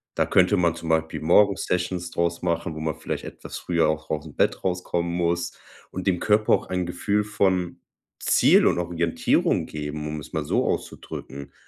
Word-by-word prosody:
Da - - +2
könnte 95 +3 +4
man 85 -2 +2
zum 85 -1 -7
Beispiel 80 0 0
morgens 100 +4 +4
Sessions 90 0 -2
draus 85 0 -1
machen, 85 -2 -1
wo 80 - -6
man 80 -1 -2
vielleicht - - -5
etwas - - -8
früher 85 -3 +1
auch 80 0 -3
ausm 75 -1 -4
Bett - - +1
rauskommen 90 -2 -1
muss 85 0 0 0.4
und 95 +1 -5
dem 90 -2 +2
Körper 105 0 +3
auch - - +1
ein 90 -1 -1
Gefühl 100 +4 0
von 95 -4 0 0.4
Ziel - - +5
und - - +2
Orientierung 85 -1 +1
geben, 75 0 -5
um 75 0 -4
es 75 - -12
mal 80 -2 -1
so - - +1
auszudrücken. 70 +1 -5
85 Hz, 180 wpm, -24 LUFS, 80-90 Hz, 0.4 s, Ziel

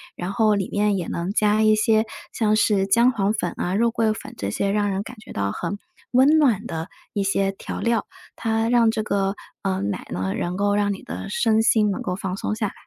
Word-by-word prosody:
然 180 +2 -4
后 215 0 +3
里 195 -2 -2
面 205 0 +1
也 175 - -3
能 170 +3 -3
加 210 0 +3
一 215 0 +5
些 220 +1 +3 0.3
像 215 -2 +1
是 205 -3 +2
姜 235 +5 +4
黄 205 -2 0
粉 180 -5 -2
啊、 180 - -1
肉 235 +3 +3
桂 225 -2 +1
粉 - - -9
这 100 0 -3
些 200 - -1
让 205 -1 +1
人 190 0 -1
感 230 +3 -9
觉 - - -11
到 100 0 -1
很 200 - -4 0.3
温 270 +5 +5
暖 235 -7 +2
的 165 +1 -4 0.3
一 200 - 0
些 195 0 +1
调 195 - -7
料， 230 -1 +1 0.3
它 225 0 0
让 235 -2 +4
这 220 - -2
个 200 -1 0 0.3
呃， 190 -1 -1
奶 100 0 -3
呢， 95 +2 -2
能 175 +1 -2
够 205 +1 +1
让 205 0 +1
你 195 - -8
的 - - -7
身 225 -12 +2
心 220 -2 +3
能 195 - -2
够 180 - -2
放 190 -1 -4
松 - - -2
下 215 -2 -1
来。 - - -8
205 Hz, 245 characters per minute, -23 LUFS, 195-220 Hz, 0.3 s, 一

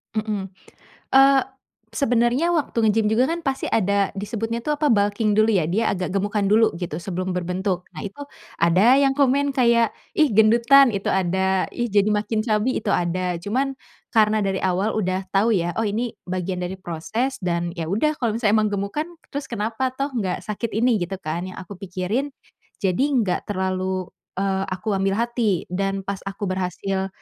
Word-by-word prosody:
Heeh. 210 -3 -2 0.7
Eee, 270 0 +7 0.5
sebenarnya 245 +4 +2
waktu 310 -7 -1
nge-gym 215 0 +3
juga, 240 +6 +2
kan, 340 +1 -2
pasti 270 0 -1
ada 200 -1 +2
disebutnya, 225 +3 -3
tuh, 300 - +1
apa, 295 0 +1
bulking 205 0 +2
dulu, 215 - +5
ya? 175 -5 +2
Dia 215 +5 +1
agak 180 -2 -3
gemukan 205 +1 0
dulu, 220 -1 +4
gitu, 170 -3 -4
sebelum 185 0 -4
berbentuk. 180 +1 -2
Nah, 155 - -7
itu 200 +8 -8 0.4
ada 190 +11 +5
yang 275 -1 +3
komen 280 0 +2
kayak, 235 -3 +3 0.2
"Ih, 305 -2 +3
gendutan," 235 +5 +6
itu 200 -1 -4
ada, 190 0 +1
"Ih, 240 - -1
jadi 205 0 +2
makin 215 +1 0
chubby," 220 +3 +1
itu 210 - -2
ada. 180 0 0
Cuman, 265 +8 -2 0.3
karena 215 -1 +3
dari 190 -1 0
awal 190 +3 0
udah 185 -1 -1
tahu, 215 +3 +3
ya, 175 0 -1
oh, 225 - +1
ini 225 +3 -2
bagian 185 0 -3
dari 180 +1 -3
proses, 215 +10 -3
dan, 170 -1 -1
ya, 165 - -2
udah 225 - +1
kalau 230 -4 0
misalnya 220 -2 +3
emang 215 - +1
gemukan, 205 - -2 0.2
terus 285 0 -4
kenapa, 225 +3 -1
toh, 275 +2 -2
enggak 195 -7 -2
sakit 215 +2 -4
ini, 235 -1 +3
gitu, 180 +2 -3
kan, 170 +4 -3
yang - - -10
aku 190 0 -9
pikirin. 195 +8 -2 0.5
Jadi, 195 +9 +2
enggak 205 -8 0
terlalu, 185 -1 -2 0.3
eee, 195 0 0
aku 190 +4 -3
ambil 195 0 +1
hati, 230 -5 0
dan 195 +1 -1
pas 200 -1 -4
aku 195 +1 -5
berhasil 190 +1 -2
205 Hz, 175 wpm, -23 LUFS, 185-235 Hz, 0.7 s, Eee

